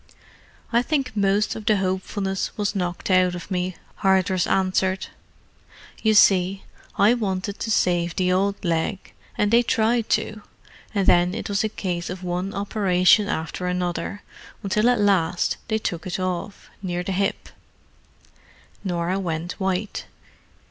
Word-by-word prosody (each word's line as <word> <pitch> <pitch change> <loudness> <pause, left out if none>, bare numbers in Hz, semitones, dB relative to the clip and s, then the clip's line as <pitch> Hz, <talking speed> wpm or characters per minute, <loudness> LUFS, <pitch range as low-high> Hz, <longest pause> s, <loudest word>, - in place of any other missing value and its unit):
"I 235 - +5
think 265 -4 -1
most 200 +1 +2
of 220 - -6
the 215 - +4
hopefulness 190 +1 -2
was 205 -1 0
knocked 180 -1 -2
out 185 -1 +4
of 175 +2 -9
me," 180 0 -1 0.2
Hardress 190 -2 +2
answered. 190 0 +1 1.0
"You 220 -1 +3
see, 195 -1 +4 0.3
I 210 +4 +5
wanted 200 -3 -2
to 225 - -3
save 175 -5 +1
the 180 -1 +1
old 200 +1 0
leg, 170 +4 -1 0.2
and 210 0 +2
they 235 +1 +6
tried 230 0 +1
to: 215 0 -7 0.5
and 200 -2 +2
then 175 +1 +4
it - - -5
was 200 +1 +1
a 220 - 0
case 175 -4 -3
of 185 +1 -6
one 180 +2 -2
operation 200 -1 +3
after 165 +3 -3
another, 180 +2 -2 0.4
until 210 +4 +2
at 245 -2 +2
last 190 -4 +2
they 220 - +1
took 175 -5 -4
it 185 - -3
off—near 185 0 -4
the 195 - -3
hip." 195 +2 -1 1.3
Norah 180 0 -1
went 170 -1 -3
white. 190 +1 -2
190 Hz, 140 wpm, -23 LUFS, 180-205 Hz, 1.3 s, they